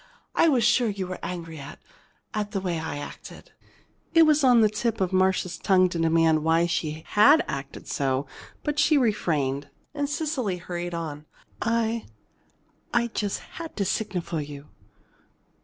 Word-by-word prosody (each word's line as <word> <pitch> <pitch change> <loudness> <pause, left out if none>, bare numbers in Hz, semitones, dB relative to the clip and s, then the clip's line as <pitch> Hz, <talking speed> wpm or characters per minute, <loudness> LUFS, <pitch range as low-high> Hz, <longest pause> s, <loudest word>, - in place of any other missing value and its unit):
"I - - +4
was 255 -6 +3
sure 240 0 +3
you 195 -2 -3
were 185 0 -6
angry 165 -3 -6
at 140 0 -9 0.6
at 210 -2 -3
the 195 - 0
way 180 -3 -2
I 160 -2 -4
acted." 145 - -10 0.6
It 330 - +8
was 305 -2 +4
on 245 -3 +6
the 215 - +6
tip 215 +2 -2
of 190 -1 0
Marcia's 185 -1 +1
tongue 185 -2 +4
to 175 - -4
demand 165 -1 +3
why 165 +1 +3
she 160 -2 -2
had 285 +10 +6
acted 140 0 -6
so, 135 0 0 0.4
but 295 0 -1
she 295 +1 +4
refrained. 150 - 0 0.2
And 285 -1 -2
Cecily 290 - -1
hurried 175 0 -5
on: 155 -2 -5 0.3
"I 230 0 0 0.8
I 235 0 +1
just 205 -2 -2 0.2
had 330 - -7
to 200 - 0
signal 185 -3 -1
for 160 -2 -3
you. 145 0 -9
185 Hz, 160 wpm, -26 LUFS, 160-235 Hz, 0.8 s, It